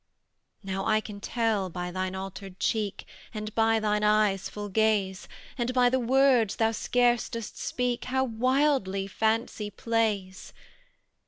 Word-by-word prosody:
"Now 195 +1 -3
I 215 -1 +3
can 210 -2 -8
tell 220 -5 0
by 180 0 -5
thine 185 +1 -3
altered 195 0 -7
cheek, 210 -3 -1 0.3
And 215 0 -5
by 225 0 +3
thine 210 -1 0
eyes' 210 -2 +2
full 205 0 -6
gaze, 200 -2 +1 0.3
And 240 +1 0
by 250 -1 +5
the 260 +1 +1
words 250 -3 +3
thou 225 0 +2
scarce 240 +1 +1
dost 230 -2 -6
speak, 250 -1 -2
How 260 +1 +1
wildly 255 -4 +1
fancy 220 +1 -1
plays. 210 -4 -2
215 Hz, 140 wpm, -27 LUFS, 195-235 Hz, 0.3 s, by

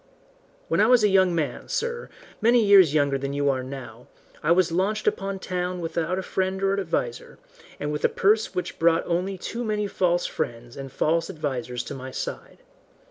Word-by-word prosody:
"When - - 0
I - - +5
was 250 -3 +5
a 210 - +5
young 190 -2 +4
man, 150 -7 -2
sir, 475 +1 -3 0.3
many 235 0 +4
years 190 -7 +6
younger 140 -2 +2
than 140 +1 -3
you 145 0 +2
are 130 -1 -2
now, 125 -3 -9 0.3
I 155 - +1
was 175 0 +3
launched 200 +5 0
upon 195 0 -1
town 180 -1 -3
without 170 +1 -2
a 190 - -2
friend 190 +1 -1
or 195 0 +2
adviser, 125 -10 -3 0.4
and 145 - -2
with 150 - -4
a - - +4
purse 210 0 +2
which 180 - -4
brought 165 0 +3
only 180 +3 -1
too 235 +6 -5
many 210 -2 -1
false 175 -3 +1
friends 120 +1 -4
and 135 -1 -7
false 165 +4 0
advisers 130 -7 -3
to - - -7
my 130 -1 -7
side. - - -7
175 Hz, 190 wpm, -25 LUFS, 140-195 Hz, 0.4 s, years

